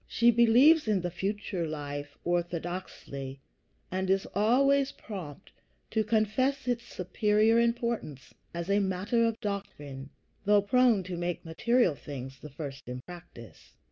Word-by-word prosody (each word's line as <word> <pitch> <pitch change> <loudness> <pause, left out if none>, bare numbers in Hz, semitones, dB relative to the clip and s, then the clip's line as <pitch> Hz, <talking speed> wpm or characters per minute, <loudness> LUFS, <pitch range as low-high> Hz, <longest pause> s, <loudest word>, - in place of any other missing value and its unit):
She 235 +1 +4
believes 240 +7 +6
in 205 -4 +2
the 175 0 -3
future 190 -1 -3
life 145 -1 -6
orthodoxly, 175 -5 -3 0.5
and 185 0 -1
is 195 +1 +2
always 270 +6 +3
prompt 175 -10 -9 0.4
to 220 0 +2
confess 230 +6 +1
its 240 -1 -1
superior 210 +5 +2
importance 235 - -1 0.2
as 170 0 -5
a 200 - +4
matter 200 +4 +1
of 230 -1 -1
doctrine, 145 -10 -5 0.3
though 205 0 +4
prone 235 -2 +4
to 180 0 -5
make 175 0 -3
material 235 +4 +2
things 135 -1 -8
the 150 - -10
first 140 -3 -8
in 125 0 -5
practice. 170 - -13
190 Hz, 135 wpm, -29 LUFS, 160-230 Hz, 0.5 s, believes